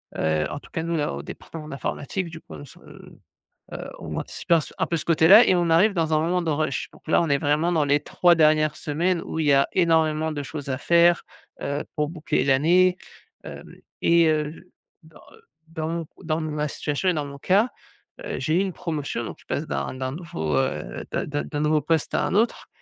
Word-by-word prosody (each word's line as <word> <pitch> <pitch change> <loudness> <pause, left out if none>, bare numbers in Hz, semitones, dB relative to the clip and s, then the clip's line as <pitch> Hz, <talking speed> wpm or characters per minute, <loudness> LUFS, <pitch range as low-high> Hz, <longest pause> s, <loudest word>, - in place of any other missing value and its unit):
Heu, 80 -1 0
en 145 - -5
tout - - -17
cas 160 - -3
nous 170 -1 -1
à - - -1
au 70 +1 -6
département 155 -2 -9
d'informatique 145 +5 -4
du 160 0 -9
coup 80 - -14
on 75 - -9
se, - - -16
heu, - - -15 0.8
on - - -6
anticipait 170 - -1
s 155 - -6
un 160 - +1
peu 170 - -1
ce - - -4
côté-là 170 +7 +7
et 185 - +4
on 175 -1 +1
arrive 195 +6 +4
dans 160 -3 0
un 155 - +3
moment 175 +2 0
de 165 - -1
rush. 155 +1 -2
Donc - - -19
là, 160 - +4
on 165 - -1
est 140 - +2
vraiment 150 +5 +1
dans 155 -4 +2
les 145 +1 +3
3 175 +4 +3
dernières 155 -1 +3
semaines 170 +4 -1
où - - -5
il 155 - 0
y 145 - +5
a 135 - +4
énormément 160 -3 +2
de 145 -1 -4
choses 145 0 -7
à 130 0 -2
faire, 170 +2 +4 0.4
heu, 140 +1 -2
pour 150 0 0
boucler 160 -5 -1
l'année. 175 +7 +4 0.5
Hem - - -10 0.3
et 170 -1 +5
heu, 155 +3 -2 0.3
dans, 160 -1 -18
heu, - - -19 0.3
dans 160 -1 -4
mon 165 -1 -3 0.2
dans 160 0 -1
ma 150 -1 -2
situation 145 +6 -2
et 180 - +3
dans 150 -2 -2
mon 140 0 -9
cas, 200 - +2 0.6
heu, - - -4
j'ai 155 - 0
eu 180 - +4
une 195 -3 -2
promotion 145 -7 -4
donc - - -7
je - - -21
passe - - -3
d'un 70 - -3
d'un 130 0 -4
nouveau, 110 - -3
heu, 65 - -2
d'un - - -1
d'un 145 0 -3
d'un 145 - -5
nouveau 150 0 +2
poste 165 -2 0
à - - +1
un - - -2
autre 225 +3 +1
155 Hz, 225 wpm, -24 LUFS, 145-170 Hz, 0.8 s, côté-là